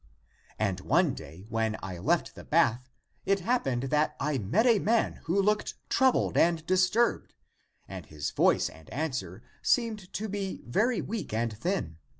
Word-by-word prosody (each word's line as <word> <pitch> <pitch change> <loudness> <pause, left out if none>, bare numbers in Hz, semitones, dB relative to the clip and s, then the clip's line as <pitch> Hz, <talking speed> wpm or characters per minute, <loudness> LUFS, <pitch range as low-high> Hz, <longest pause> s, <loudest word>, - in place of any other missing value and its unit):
And 100 -4 0
one 150 - +2
day 80 +5 -10
when 110 -1 -1
I 95 -3 -5
left - - +1
the - - -11
bath, 125 +3 +2 0.3
it 195 0 +1
hap 240 +7 +1
pened 130 0 -1
that 150 0 +2
I 140 -1 0
met 120 - +1
a 230 -4 +5
man 225 +3 +1
who 175 +5 +1
looked 210 +2 +1 0.2
troubled 260 -1 +3
and 165 -2 +3
dis 185 +1 +3
turbed. 235 +3 0 0.5
And - - -8
his 75 -2 -4
voice - - +3
and 80 -1 -13
answer 125 - -4 0.2
seemed 220 -6 0
to 220 - -3
be 200 -1 -4
very 215 - +1
weak 200 - -4
and 115 -1 -1
thin. 140 - -2
160 Hz, 165 wpm, -29 LUFS, -, 0.5 s, a